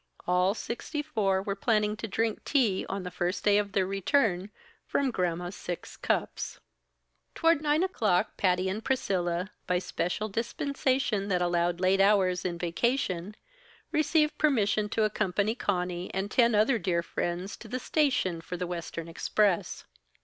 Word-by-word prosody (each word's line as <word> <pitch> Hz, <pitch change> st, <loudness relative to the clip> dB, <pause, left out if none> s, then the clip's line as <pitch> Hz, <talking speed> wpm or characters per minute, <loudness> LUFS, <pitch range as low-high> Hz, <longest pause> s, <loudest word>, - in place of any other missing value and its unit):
All 180 Hz, +3 st, +2 dB
sixty 295 Hz, +6 st, -4 dB
four 200 Hz, -10 st, 0 dB
were 200 Hz, 0 st, -2 dB
planning 210 Hz, 0 st, +1 dB
to 225 Hz, -, -4 dB
drink 220 Hz, +2 st, -1 dB
tea, 235 Hz, -10 st, +1 dB
on 195 Hz, -1 st, -3 dB
the 180 Hz, -, -5 dB
first 180 Hz, +1 st, -2 dB
day 205 Hz, 0 st, +5 dB
of 200 Hz, -1 st, -3 dB
their 195 Hz, -2 st, +2 dB
return, 195 Hz, -1 st, +1 dB, 0.4 s
from 275 Hz, -2 st, +1 dB
Gramma's 175 Hz, -2 st, -2 dB
six 175 Hz, -3 st, -6 dB
cups. -, -, -2 dB, 0.8 s
Toward 330 Hz, -2 st, +3 dB
nine 305 Hz, +2 st, +2 dB
o'clock, 215 Hz, -, +1 dB
Patty 185 Hz, -1 st, +1 dB
and 205 Hz, +4 st, -3 dB
Priscilla, 185 Hz, -7 st, -1 dB, 0.2 s
by 180 Hz, -, +1 dB
a -, -, +3 dB
special 180 Hz, +4 st, -2 dB
dispensation 240 Hz, -1 st, -1 dB
that 180 Hz, -3 st, +1 dB
allowed 175 Hz, 0 st, +1 dB
late 190 Hz, +1 st, +3 dB
hours 190 Hz, -3 st, +3 dB
in 175 Hz, -2 st, -1 dB
vacation, 185 Hz, +1 st, -1 dB, 0.6 s
received 305 Hz, 0 st, +2 dB
permission 215 Hz, -8 st, +2 dB
to 220 Hz, -, +1 dB
accompany 210 Hz, 0 st, +1 dB
Conny 180 Hz, -5 st, -2 dB
and 195 Hz, +2 st, -2 dB
ten 235 Hz, -3 st, +4 dB
other 220 Hz, +3 st, +3 dB
dear 170 Hz, -2 st, 0 dB
friends 175 Hz, +3 st, -3 dB
to -, -, -11 dB
the 255 Hz, -, -3 dB
station 255 Hz, -, +1 dB
for 180 Hz, +2 st, -6 dB
the 180 Hz, -, -2 dB
western 170 Hz, -1 st, -5 dB
express. 190 Hz, +3 st, 0 dB
195 Hz, 155 wpm, -29 LUFS, 180-230 Hz, 0.8 s, day